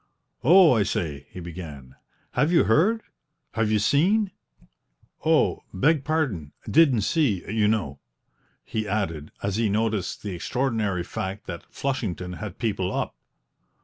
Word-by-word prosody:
"Oh, 175 Hz, +4 st, +7 dB
I 115 Hz, -, +3 dB
say!" 75 Hz, -8 st, -2 dB
he -, -, -9 dB
began, 80 Hz, -7 st, -8 dB, 0.4 s
"have 150 Hz, +3 st, +2 dB
you 175 Hz, -, +5 dB
heard 205 Hz, -, +3 dB, 0.5 s
have 115 Hz, -2 st, 0 dB
you 110 Hz, -, +3 dB
seen? 185 Hz, -, +3 dB, 0.9 s
Oh, -, -, +3 dB
beg 145 Hz, -, +2 dB
pardon, 130 Hz, -, -1 dB
didn't 140 Hz, -8 st, +5 dB
see, 110 Hz, -, +1 dB
you 105 Hz, 0 st, +2 dB
know!" 100 Hz, -11 st, -1 dB, 0.6 s
he 110 Hz, -1 st, -3 dB
added, 85 Hz, -7 st, -2 dB
as 100 Hz, 0 st, -1 dB
he 115 Hz, -2 st, +2 dB
noticed 105 Hz, -2 st, -1 dB
the 100 Hz, -3 st, -4 dB
extraordinary 105 Hz, -2 st, -1 dB
fact 95 Hz, +3 st, -5 dB
that 85 Hz, -2 st, -8 dB
Flushington 105 Hz, -10 st, -3 dB
had 105 Hz, -4 st, -7 dB
people 100 Hz, -5 st, -1 dB
up. -, -, -2 dB
105 Hz, 135 wpm, -25 LUFS, 90-135 Hz, 0.9 s, Oh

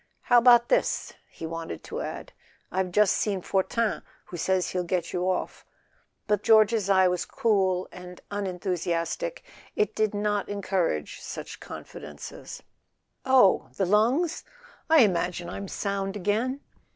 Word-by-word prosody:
"How 245 Hz, -1 st, +5 dB
about 240 Hz, 0 st, +6 dB
this -, -, +1 dB
?" -, -, -39 dB
He -, -, -8 dB
wanted 165 Hz, -, -6 dB
to -, -, -5 dB
add: -, -, -6 dB, 0.4 s
"I've 185 Hz, 0 st, -1 dB
just 210 Hz, +1 st, +4 dB
seen 195 Hz, -4 st, -1 dB
Fortin, 210 Hz, +3 st, 0 dB, 0.2 s
who -, -, -9 dB
says 185 Hz, +2 st, 0 dB
he'll 180 Hz, -1 st, -1 dB
get 175 Hz, -1 st, -2 dB
you 180 Hz, +1 st, 0 dB
off"; 185 Hz, -, -3 dB, 0.6 s
but 210 Hz, -2 st, +1 dB
though -, -, -33 dB
George's 220 Hz, -2 st, +4 dB
eye 190 Hz, -1 st, +5 dB
was 180 Hz, -1 st, 0 dB
cool 190 Hz, -5 st, +1 dB
and 180 Hz, 0 st, -10 dB
unenthusiastic 185 Hz, -, -2 dB, 0.3 s
it 430 Hz, -1 st, +1 dB
did 215 Hz, -1 st, 0 dB
not 205 Hz, 0 st, -1 dB
encourage 190 Hz, -, -2 dB
such -, -, -7 dB
confidences. 75 Hz, 0 st, -9 dB, 0.6 s
"Oh—lungs? 220 Hz, -, +3 dB, 0.5 s
I 320 Hz, -2 st, +7 dB
imagine 175 Hz, -3 st, -1 dB
I'm 200 Hz, -, -6 dB
sound 195 Hz, 0 st, -3 dB
again." 220 Hz, +8 st, -1 dB
195 Hz, 135 wpm, -26 LUFS, 180-215 Hz, 0.6 s, I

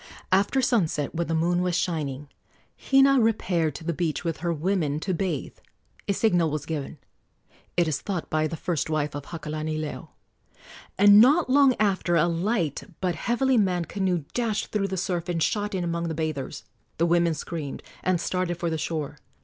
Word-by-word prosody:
After 200 Hz, +8 st, +3 dB
sunset, 170 Hz, -, +1 dB
when 170 Hz, +1 st, -2 dB
the 165 Hz, -, 0 dB
moon 175 Hz, +2 st, +1 dB
was 180 Hz, -1 st, 0 dB
shining, 145 Hz, -5 st, -2 dB, 0.5 s
Hina 270 Hz, 0 st, +4 dB
repaired 175 Hz, -9 st, +1 dB
to -, -, -8 dB
the 170 Hz, +1 st, -1 dB
beach 165 Hz, -1 st, -2 dB
with 165 Hz, -2 st, -2 dB
her 170 Hz, 0 st, -2 dB
women 160 Hz, -2 st, 0 dB
to 190 Hz, -, -1 dB
bathe. 170 Hz, -5 st, -3 dB, 0.5 s
A 200 Hz, -, +2 dB
signal 180 Hz, -6 st, +2 dB
was 150 Hz, -1 st, -3 dB
given 150 Hz, -4 st, -4 dB, 0.8 s
it 175 Hz, -1 st, +3 dB
is 155 Hz, -, -1 dB
thought 185 Hz, -5 st, -3 dB
by 155 Hz, 0 st, 0 dB
the 165 Hz, -, -5 dB
first 165 Hz, -4 st, -2 dB
wife 150 Hz, -2 st, -1 dB
of 145 Hz, 0 st, -6 dB
Hakalanileo 155 Hz, -1 st, -4 dB, 0.9 s
and 205 Hz, +1 st, +8 dB
not 285 Hz, +3 st, +4 dB
long 275 Hz, -2 st, +5 dB
after 190 Hz, -4 st, +1 dB
a 165 Hz, 0 st, +4 dB
light 170 Hz, -, -1 dB, 0.2 s
but 180 Hz, -2 st, 0 dB
heavily 240 Hz, +7 st, +1 dB
manned 180 Hz, -5 st, 0 dB
canoe 185 Hz, -5 st, 0 dB
dashed 225 Hz, -3 st, -1 dB
through 200 Hz, -2 st, 0 dB
the 190 Hz, 0 st, -4 dB
surf 175 Hz, -1 st, -2 dB
and 165 Hz, -2 st, 0 dB
shot 205 Hz, +2 st, -1 dB
in 180 Hz, -, -1 dB
among 170 Hz, 0 st, -2 dB
the 160 Hz, -, -3 dB
bathers. 155 Hz, -4 st, -4 dB, 0.3 s
The 170 Hz, -, +2 dB
women 170 Hz, -1 st, +2 dB
screamed 150 Hz, -2 st, -6 dB, 0.2 s
and 185 Hz, -2 st, +1 dB
started 180 Hz, 0 st, -1 dB
for 170 Hz, -1 st, -2 dB
the 160 Hz, -, -2 dB
shore. 150 Hz, -2 st, -3 dB
170 Hz, 180 wpm, -26 LUFS, 155-195 Hz, 0.9 s, and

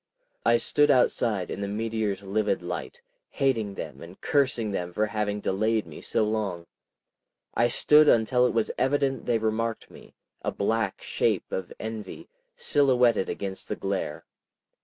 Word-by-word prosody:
I 120 Hz, 0 st, +5 dB
stood 145 Hz, +5 st, +2 dB
outside 115 Hz, -7 st, +2 dB
in -, -, -4 dB
the 100 Hz, -, -2 dB
meteor's 105 Hz, -1 st, -2 dB
livid 105 Hz, +2 st, 0 dB
light, 485 Hz, 0 st, -6 dB, 0.3 s
hating 115 Hz, -8 st, 0 dB
them -, -, -7 dB
and 85 Hz, +3 st, -11 dB
cursing 130 Hz, -6 st, +1 dB
them 90 Hz, -2 st, -3 dB
for 105 Hz, +5 st, +1 dB
having 105 Hz, -1 st, -2 dB
delayed 110 Hz, +3 st, 0 dB
me -, -, -11 dB
so -, -, 0 dB
long. 105 Hz, -6 st, -2 dB, 0.9 s
I 120 Hz, -, +3 dB
stood 150 Hz, +5 st, +5 dB
until 125 Hz, +2 st, +4 dB
it -, -, -1 dB
was 115 Hz, -2 st, 0 dB
evident 135 Hz, -1 st, +1 dB
they 120 Hz, -2 st, +3 dB
remarked 110 Hz, +1 st, -2 dB
me, -, -, -15 dB, 0.3 s
a -, -, -2 dB
black 110 Hz, 0 st, -1 dB
shape -, -, 0 dB
of 95 Hz, -1 st, -4 dB
envy, 110 Hz, -3 st, -6 dB, 0.3 s
silhouetted 125 Hz, -7 st, +3 dB
against 95 Hz, -1 st, -5 dB
the -, -, -2 dB
glare. 95 Hz, -6 st, -3 dB
110 Hz, 150 wpm, -27 LUFS, 100-120 Hz, 0.9 s, I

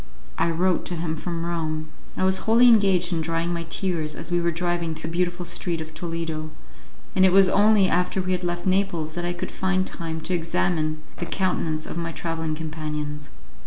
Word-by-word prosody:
I 170 Hz, -, +3 dB
wrote 180 Hz, +2 st, +1 dB
to 175 Hz, -, -2 dB
him 160 Hz, -1 st, -2 dB
from 170 Hz, +1 st, -4 dB
Rome. 155 Hz, -2 st, -2 dB, 0.3 s
I -, -, 0 dB
was 190 Hz, 0 st, +3 dB
wholly 235 Hz, +2 st, +7 dB
engaged 195 Hz, -6 st, +5 dB
in 165 Hz, -, 0 dB
drying 165 Hz, +1 st, -1 dB
my 170 Hz, -1 st, -3 dB
tears 165 Hz, -5 st, -1 dB
as -, -, -5 dB
we 175 Hz, 0 st, +2 dB
were 170 Hz, -, +2 dB
driving 170 Hz, -1 st, -1 dB
through 160 Hz, +1 st, -5 dB
the -, -, -6 dB
beautiful 175 Hz, 0 st, 0 dB
street 175 Hz, 0 st, -2 dB
of 160 Hz, 0 st, -7 dB
Toledo, 165 Hz, -1 st, -4 dB, 0.7 s
and 190 Hz, -, +5 dB
it 190 Hz, -, +6 dB
was 195 Hz, 0 st, +7 dB
only 205 Hz, 0 st, +5 dB
after 180 Hz, +2 st, +1 dB
we 185 Hz, 0 st, -1 dB
had 180 Hz, 0 st, 0 dB
left 175 Hz, 0 st, -2 dB
Naples 185 Hz, -5 st, +1 dB
that 175 Hz, +1 st, -3 dB
I 175 Hz, -, -1 dB
could 175 Hz, -, -5 dB
find 190 Hz, 0 st, 0 dB
time 165 Hz, -3 st, -5 dB
to 185 Hz, -, -2 dB
examine 160 Hz, -2 st, 0 dB
the -, -, -4 dB
countenance 165 Hz, -5 st, -1 dB
of 170 Hz, -, -5 dB
my 165 Hz, -1 st, -3 dB
travelling 160 Hz, -1 st, -3 dB
companions. 150 Hz, -2 st, -5 dB
170 Hz, 200 wpm, -24 LUFS, 160-185 Hz, 0.7 s, wholly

